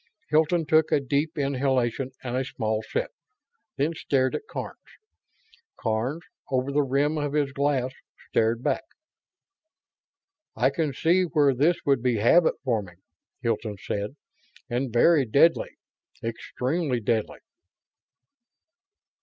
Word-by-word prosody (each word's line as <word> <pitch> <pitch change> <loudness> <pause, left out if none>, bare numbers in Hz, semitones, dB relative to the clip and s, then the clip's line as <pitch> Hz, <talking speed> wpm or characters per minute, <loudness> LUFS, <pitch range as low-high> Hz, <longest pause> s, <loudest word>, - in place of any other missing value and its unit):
Hilton 160 +2 +2
took 155 +1 +3
a - - +4
deep 145 +4 -1
inhalation 135 -2 0
and 125 -1 -3
a 130 - +1
small 110 -4 -2
sip, - - -3 0.7
then 145 +4 +1
stared 130 -4 0
at 435 - -4
Karns. - - -6 1.0
Karns, 120 +9 -1 0.3
over 130 +1 0
the 145 +1 +3
rim 145 +3 +1
of 145 -1 -2
his 145 -2 +1
glass, 135 -2 0 0.4
stared 115 +2 +1
back. - - 0 1.7
"I 130 +3 +2
can 155 -1 -1
see 170 +7 +2
where 150 -6 +3
this 150 +7 +3
would 140 -4 +3
be 125 -1 +1
habit 140 +11 +4
forming," 105 -9 -2 0.4
Hilton 110 -3 -2
said, 105 +5 -4 0.6
"and 125 +1 -1
very 145 +6 +5
deadly. 140 +8 +3 0.5
Extremely 125 +5 -2
deadly." 110 0 -1
135 Hz, 120 wpm, -26 LUFS, 120-150 Hz, 1.7 s, very